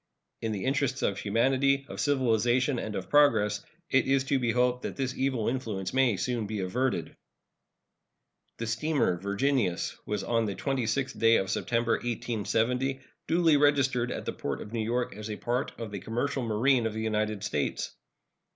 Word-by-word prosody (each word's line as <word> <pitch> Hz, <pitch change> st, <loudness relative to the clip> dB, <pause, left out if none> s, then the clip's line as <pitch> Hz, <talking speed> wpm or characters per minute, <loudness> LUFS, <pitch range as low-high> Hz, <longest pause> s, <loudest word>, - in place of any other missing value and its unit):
In 115 Hz, -, -1 dB
the 100 Hz, 0 st, -3 dB
interests 135 Hz, -1 st, 0 dB
of 100 Hz, -, 0 dB
humanity, 135 Hz, +6 st, +2 dB
of -, -, -8 dB
civilization, 125 Hz, -1 st, +2 dB
and 110 Hz, -2 st, -4 dB
of 95 Hz, -, -4 dB
progress, 110 Hz, -9 st, +3 dB, 0.3 s
it 130 Hz, -2 st, +3 dB
is 135 Hz, 0 st, +3 dB
to 135 Hz, 0 st, +1 dB
be 120 Hz, -2 st, 0 dB
hoped 125 Hz, +1 st, +2 dB
that -, -, -5 dB
this 130 Hz, -2 st, -2 dB
evil 130 Hz, -5 st, 0 dB
influence 110 Hz, -7 st, -2 dB
may 130 Hz, -3 st, +4 dB
be -, -, -3 dB
soon 120 Hz, -1 st, -1 dB
averted. 125 Hz, +8 st, -1 dB, 1.4 s
The 115 Hz, -, -3 dB
steamer 120 Hz, -, +1 dB
Virginius 100 Hz, 0 st, 0 dB
was 105 Hz, -1 st, -2 dB
on 115 Hz, -1 st, +1 dB
the 100 Hz, -2 st, -3 dB
26th 135 Hz, -1 st, -1 dB
day 115 Hz, 0 st, +5 dB
of 95 Hz, -2 st, +1 dB
September, 115 Hz, -1 st, 0 dB
1870, 120 Hz, +3 st, -1 dB, 0.3 s
duly 165 Hz, -3 st, +4 dB
registered 135 Hz, -4 st, +2 dB
at -, -, -5 dB
the -, -, -2 dB
port 70 Hz, -, -4 dB
of 105 Hz, -, -9 dB
New 115 Hz, -2 st, -1 dB
York 120 Hz, +1 st, -1 dB
as 105 Hz, +1 st, -7 dB
a 105 Hz, -, -3 dB
part 125 Hz, +3 st, -1 dB
of 115 Hz, -3 st, -5 dB
the 100 Hz, -, -4 dB
commercial 125 Hz, +7 st, -2 dB
marine 120 Hz, +2 st, +2 dB
of 110 Hz, -, -4 dB
the 110 Hz, -, -2 dB
United 110 Hz, -2 st, -1 dB
States. 75 Hz, -8 st, -2 dB
120 Hz, 170 wpm, -28 LUFS, 110-135 Hz, 1.4 s, day